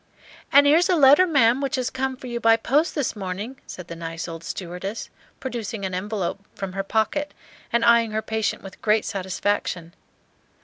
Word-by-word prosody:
"And 285 +1 +7
'ere's 320 +6 +5
a 365 - +4
letter, 295 +4 +7
ma'am, 265 -5 +3
which 275 -2 -1
has 255 -2 -2
come 260 0 -2
for 260 - -11
you 240 -1 -3
by 225 -1 +5
post 290 +9 +1
this 290 -7 -1
morning," 205 +6 -5
said 180 -2 -9
the 170 - -7
nice 165 0 -5
old 165 -1 -7
stewardess, 180 +5 -6 0.3
producing 230 -5 -4
an 190 - -4
envelope 195 0 -3 0.2
from 195 -2 -5
her 195 - -1
pocket, 220 +9 -1 0.4
and 235 0 +2
eying 235 -1 +5
her 215 0 -2
patient 220 -1 -2
with 195 -1 -11
great 215 0 +2
satisfaction. 185 -2 -2
220 Hz, 180 wpm, -24 LUFS, 190-265 Hz, 0.4 s, And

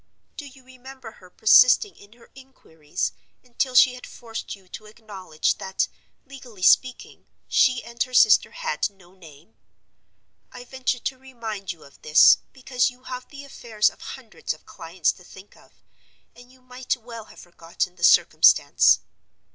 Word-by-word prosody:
Do 290 - -9
you 265 -1 -17
remember 260 -2 -13
her 180 - -17
persisting 250 - +4
in 200 +2 -19
her 235 0 -22
inquiries, 185 - -7 0.3
until 250 +1 -4
she 250 0 +6
had 250 - -11
forced 225 -3 -8
you 190 -2 -23
to 215 - -11
acknowledge 195 -7 -4
that, 190 0 -2 0.4
legally 255 -8 -13
speaking, 255 +6 +1 0.2
she 255 -1 +2
and 235 0 -11
her 255 - -1
sister 215 -3 +5
had - - -3
No 190 -3 -23
Name? 170 +2 -18 1.0
I 250 - -11
venture 260 0 -3
to 260 +1 -6
remind 225 -7 -7
you 165 -3 -13
of 140 - -20
this, 155 0 +6
because 255 -1 -1
you 250 0 -18
have 255 -1 -8
the 285 -1 -11
affairs 225 -6 -1
of - - -22
hundreds 230 -10 -7
of - - -25
clients 165 0 -3
to 180 - -18
think 190 +3 -16
of, - - -22 0.6
and 245 +1 -17
you 260 0 -24
might 250 0 -4
well 230 -2 -11
have - - -16
forgotten 175 +1 -6
the 175 - -12
circumstance. - - +4
235 Hz, 160 wpm, -23 LUFS, 190-255 Hz, 1.0 s, she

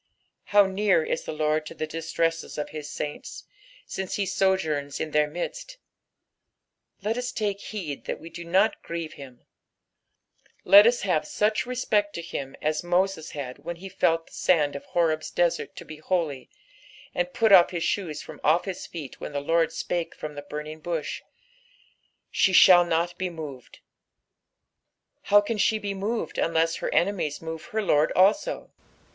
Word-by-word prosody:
Bow 205 -1 +7
near 190 -3 +2
ia - - 0
the - - -6
Lord 155 0 0
to - - -9
the - - -3
distresses 165 +1 -2
of 150 - -3
his 150 -1 -7
saints, 150 - -6 0.4
since 190 -1 -4
he 200 - 0
sojourns 160 -8 0
in 155 - -3
their 150 0 +3
midst - - -6
I 200 - -33
Let 225 +2 0
us 245 0 -3
take 205 -4 -2
heed 170 -10 -6
that - - -4
we 165 - -11
do 170 +1 -7
not 190 +6 +2
grieve 165 -2 -5
him; 130 -3 -12 1.2
lot 205 +2 +9
us 240 +1 +2
have 160 -6 0
such 215 +2 0
respect 215 -5 0
to 170 - -5
him 135 -5 -6
as 155 0 0
Hoses 175 -1 0
had 135 -3 -6
when 170 +4 -6
he 190 +3 -9
felt 165 -3 +1
the - - -20
sand 150 -6 +2
of 140 - -7
Horeb's 160 -2 0
desert 175 -1 0
to - - -9
be 155 - -9
holy, 155 -6 -2 0.6
and 180 0 -1
put 220 +3 +2
off 180 -3 +9
bis 175 -3 -3
shoes 165 -7 -2
from - - -11
off 160 +4 +3
his 190 -2 -5
feet 155 -6 -8
when - - -7
the 140 - -1
Lord 165 +3 +1
spake 170 +1 -3
from 155 -1 -6
the 145 - -7
burning 150 +2 -7
bush. 160 -1 -3 1.1
"She 190 - +3
ihaU 175 -1 +8
not 170 +2 0
be 185 -1 -1
moved." 150 -7 -9 1.4
How 205 0 +6
can 210 +1 -3
she 220 +2 +3
be 205 -2 -4
moved 210 +4 -3
unless 165 0 +1
her - - -3
enemies 170 -6 0
move 160 0 -7
her 220 +3 -2
Lord 150 -5 +3
also 200 +11 +2
170 Hz, 170 wpm, -26 LUFS, 155-195 Hz, 1.4 s, lot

